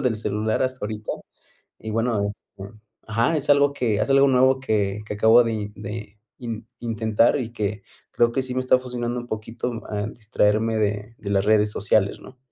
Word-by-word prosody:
uso - - -4
del 125 -4 +1
celular 110 +2 -1
hasta 130 -4 -2
ahorita. 105 0 -5 0.7
Y 110 - -7
bueno, 115 0 0
este, 100 0 -11 0.3
ajá. 115 +8 +1
Es 145 0 -1
algo 145 0 +5
que 120 -6 0
es - - -1
algo 135 0 +6
nuevo 130 0 +4
que 105 -4 -1
que 105 - -4
acabo 110 +3 +6
de 115 - -1
i 105 -1 -3
de 105 +1 -7 0.2
in 115 -2 -6
intentar, 115 +2 +2
y 115 -2 -5
que 105 -2 -3 0.3
creo 120 0 +3
que 135 - 0
sí 130 -1 -4
me 130 - 0
está 130 0 +4
fusionando 125 -1 -3
un 120 - -11
poquito, 115 +2 -4
en 105 +1 -3
distraerme 110 0 +1
de 105 +1 -2
de 100 - -6
las 100 -1 +2
redes 105 0 +3
sociales, 105 -1 +1
¿no? 130 - -14
110 Hz, 195 wpm, -23 LUFS, 105-125 Hz, 0.7 s, algo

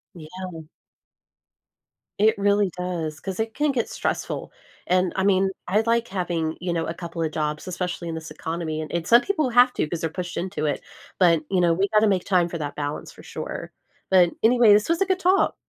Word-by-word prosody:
Yeah. 170 +1 -8 1.6
It 215 0 +4
really 200 0 +2
does, 170 -4 -3
'cause 190 0 -6
it 220 0 -2
can 295 0 +1
get 240 -4 -1
stressful, - - -3 0.3
and, 185 0 +1
I 190 - 0
mean, 195 -1 +3 0.2
I 200 +4 +3
like 235 0 +1
having, 170 -4 -2
you 180 -1 -2
know, 165 -1 -1
a 165 - -3
couple 170 -1 -5
of 155 - -1
jobs, 150 +1 -3
especially 180 -1 -4
in 165 - -3
this 160 -1 -7
economy, 160 0 -4
a - - -5
and 170 0 -2
some 235 +1 +7
people 310 -9 0
have 245 +1 +5
to - - -1
'cause 165 0 -4
they're 165 - -1
pushed 175 -1 -5
into 180 -3 -3
it, 145 - -1 0.4
but, 170 -4 +5
you 190 -2 +1
know, 170 -1 +4
we 195 +4 +1
gotta 215 +1 +3
make 190 -3 +1
time 180 -3 +2
for 170 - -4
that 145 -1 -4
balance 145 0 -4
for - - -15
sure. - - -6 0.4
But, 180 -2 +6
anyway, 230 -2 +6
this 210 +6 +3
was 335 +3 +1
a - - +4
good 375 -1 +1
talk. 380 +1 +3
180 Hz, 210 wpm, -24 LUFS, 165-210 Hz, 1.6 s, some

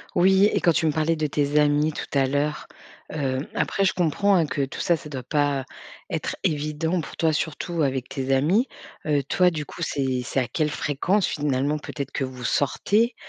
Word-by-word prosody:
Oui 190 +2 +5
et - - +1
quand 170 - +4
tu 160 - +1
me 155 - +2
parlais 160 +2 +1
de 155 -1 0
tes 145 0 +1
amis 150 +1 +3
tout - - -5
à 135 - +4
l'heure, 145 +2 -1 0.5
heu, 135 -3 -1
après 195 - 0
je 190 - +3
comprends, 185 +4 +2
hein, 165 -3 +3
que 140 -1 -1
tout 135 - -7
ça, 170 - +3
ça 150 - -10
doit 130 -3 -5
pas 140 0 0 0.4
être - - -3
évident 155 +3 0
pour - - -10
toi 160 -2 +3
surtout 160 +2 -2
avec 130 -2 -1
tes 135 -1 -2
amis. 180 - +2 0.4
Heu, 145 -2 +1
toi 180 +6 +3
du 155 -3 -4
coup 170 - -9
c'est 130 -4 -1
c'est 135 - 0
à 125 - -2
quelle 155 -2 0
fréquence 150 +9 0
finalement 145 0 0
peut-être 140 -2 -6
que 135 - -2
vous 130 -1 -7
sortez? 210 - +1
150 Hz, 205 wpm, -24 LUFS, 140-165 Hz, 0.5 s, Oui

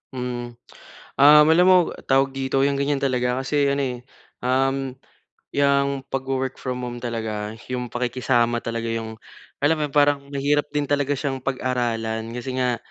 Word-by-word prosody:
Mm. 120 -1 -5 0.6
Um, 150 +2 +8
alam 175 +3 +5
mo, 185 0 +7 0.3
tawag 135 0 +3
dito 135 0 0
yung 140 0 +1
ganyan 140 0 0
talaga 125 -2 0
kasi 145 +1 +1
ano, 140 0 0
eh, 125 -2 -2 0.5
um, 135 +1 0 0.6
yang 140 -1 +1
pag 135 -1 -2
wo-work 130 -1 -2
from 125 -1 -3
home 120 0 -6
talaga, 110 -3 -4 0.2
yung 125 -1 -2
pakikisama 120 -1 0
talaga 115 0 -3
yung 110 -1 -4 0.5
alam 155 +3 +4
mo - - 0
yun - - -19
parang 145 -1 +4
mahirap 145 +1 +1
din 145 -1 0
talaga 145 -1 +1
siyang 135 -1 -2
pag-aralan. 115 -4 -2
Kasi 125 +1 -4
nga, 125 -2 +1
130 Hz, 160 wpm, -23 LUFS, 120-140 Hz, 0.6 s, Um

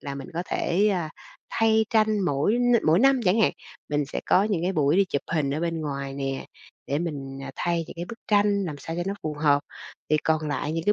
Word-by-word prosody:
là 140 -1 -5
mình 140 +2 -7
có 175 - -1
thể, 195 +5 +1
a, 175 -6 -1 0.4
thay 220 0 +3
tranh 215 -2 +3
mỗi 180 - +1
n 245 0 +3
mỗi 160 +3 +5
năm 270 +1 +4
chẳng 190 +5 +3
hạn. - - +4 0.4
Mình 145 0 0
sẽ - - -4
có 190 - +5
những 195 -6 0
cái 185 +2 0
buổi 150 0 +2
đi 200 - +5
chụp 140 -7 -2
hình 145 -3 +1
ở 155 - -2
bên 165 -1 -1
ngoài 140 -2 -4
nè, 135 -1 -3 0.4
để 140 +2 0
mình, 140 -5 -4
à, 135 - -6
thay 170 -1 0
những - - -10
cái 170 - -4
bức 230 +5 -9
tranh 205 -1 +3
làm 150 -5 -5
sao 165 +3 -6
cho 175 - -1
nó 195 - -1
phù 155 -1 -3
hợp. 145 -1 +4 0.5
Thì 155 - +5
còn 155 0 0
lại 150 +1 -2
những 165 0 -2
cái 210 - +4
165 Hz, 245 wpm, -25 LUFS, 145-200 Hz, 0.5 s, mỗi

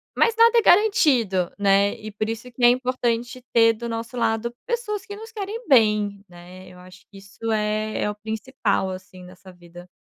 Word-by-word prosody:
Mas 460 -1 +2
nada 465 +1 +5
é - - +2
garantido, 265 - +3
né. 200 +1 +2
E 215 -1 -9
por 215 +1 -3
isso 230 +2 -6
que 245 +1 -6
é 240 - +8
importante 250 -1 -1
ter 230 -1 +5
do 235 +1 -7
nosso 230 +2 -5
lado 235 0 -1
pessoas 445 -5 -3
que 410 - -8
nos 445 +2 -11
querem 440 +2 -6
bem, 210 -6 +2
né. 180 +1 -13
Eu 180 - -15
acho 185 +1 -15
que 200 - -15
isso 200 +3 -6
é 215 0 -1
é - - 0
o 210 - -5
principal 220 -2 -2
assim 185 0 -11
nessa 185 +1 -14
vida. 175 0 -15
220 Hz, 190 wpm, -23 LUFS, 195-255 Hz, -, é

